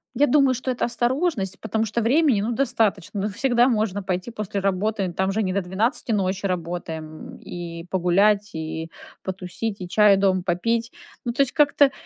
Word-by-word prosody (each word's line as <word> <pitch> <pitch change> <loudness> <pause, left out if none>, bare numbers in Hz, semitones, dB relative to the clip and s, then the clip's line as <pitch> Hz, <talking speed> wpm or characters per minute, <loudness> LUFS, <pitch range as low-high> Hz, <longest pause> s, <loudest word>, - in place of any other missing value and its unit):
Я 290 - +4
думаю, 275 0 +4
что 255 +1 -2
это 245 - -1
осторожность, 240 - -1
потому 220 0 -1
что 225 +2 -1
времени, 260 -1 +3
ну, 220 +4 -1
достаточно. 220 -6 0
Ну, 205 - 0
всегда 240 +3 +2
можно 215 -5 0
пойти 185 +4 -3
после 210 -2 -3
работы. 195 0 0
Там 190 +2 0
же 215 +2 0
не 185 -2 -1
до 200 - +1
12 220 +9 -1
ночи 195 -2 0
работаем. 165 -3 -5
И 170 -1 -7
погулять, 200 +3 +3
и 160 +1 -4 0.3
потусить, 190 +3 -4
и 180 - -5
чай 205 +1 +5
дома 190 -1 +2
попить. 230 +7 0 0.3
Ну, 240 - -1
то 255 - +1
есть 270 -2 +2
как-то 285 -2 +4
205 Hz, 175 wpm, -23 LUFS, 185-235 Hz, 0.3 s, чай